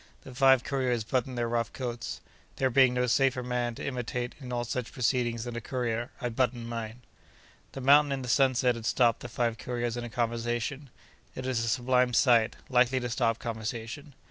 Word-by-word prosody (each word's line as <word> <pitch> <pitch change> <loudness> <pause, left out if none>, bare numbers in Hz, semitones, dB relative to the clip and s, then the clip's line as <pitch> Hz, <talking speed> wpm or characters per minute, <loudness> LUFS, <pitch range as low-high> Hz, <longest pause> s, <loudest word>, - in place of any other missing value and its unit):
The 130 - -10
five 135 -1 +5
couriers 125 -4 0
buttoned 125 +2 -2
their 120 -1 0
rough 115 -2 -1
coats. 120 -2 -5 0.3
There 130 -1 +1
being 130 0 +5
no 125 0 +2
safer 130 0 +2
man 120 -1 -2
to - - -6
imitate 125 -2 -3
in 130 -3 -8
all 120 -1 -1
such 120 0 -4
proceedings 120 -2 0
than 120 -1 -6
a 120 - -4
courier, 120 -1 -2
I 125 - -2
buttoned 120 0 -1
mine. 115 0 -6 0.7
The 135 - -6
mountain 145 +2 +6
in 135 -1 -2
the - - -6
sunset 130 -1 +3
had 115 -1 -5
stopped 120 -3 +3
the 120 - -8
five 115 -1 -1
couriers 120 -1 -3
in 120 - -4
a 120 - -6
conversation. 120 +4 -2 0.5
It 130 - -5
is 125 -3 0
a 115 - -1
sublime 125 -1 +2
sight, 120 -3 +4
likely 125 0 +3
to 120 -1 -3
stop 115 -1 +1
conversation. 115 +5 -6
125 Hz, 195 wpm, -29 LUFS, 115-130 Hz, 0.7 s, mountain